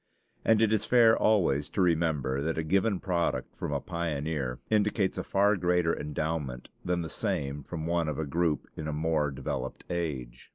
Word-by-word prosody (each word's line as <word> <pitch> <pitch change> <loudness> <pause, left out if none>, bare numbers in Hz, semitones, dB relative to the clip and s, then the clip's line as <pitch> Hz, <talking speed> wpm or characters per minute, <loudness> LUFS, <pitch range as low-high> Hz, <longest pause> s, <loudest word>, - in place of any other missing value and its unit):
And 110 0 +4
it 110 -1 +3
is 110 0 +1
fair 115 -2 +6
always 85 -10 +2
to - - -5
remember 80 -6 +1
that 80 +2 -1
a 80 - 0
given 95 +4 +1
product 85 -3 -1
from - - -4
a 70 - 0
pioneer 75 -6 -2
indicates 105 -2 +2
a - - -2
far 100 +2 +3
greater 90 -2 +2
endowment 75 -4 -3
than 90 -1 0
the - - -4
same 70 -1 -2
from 80 +3 -6
one 85 -1 +1
of 75 - -3
a 80 - -1
group 80 +1 0
in 80 - -5
a 75 - -2
more 75 -1 +1
developed 65 -1 -4
age. 75 -9 -4
80 Hz, 180 wpm, -29 LUFS, 75-90 Hz, -, fair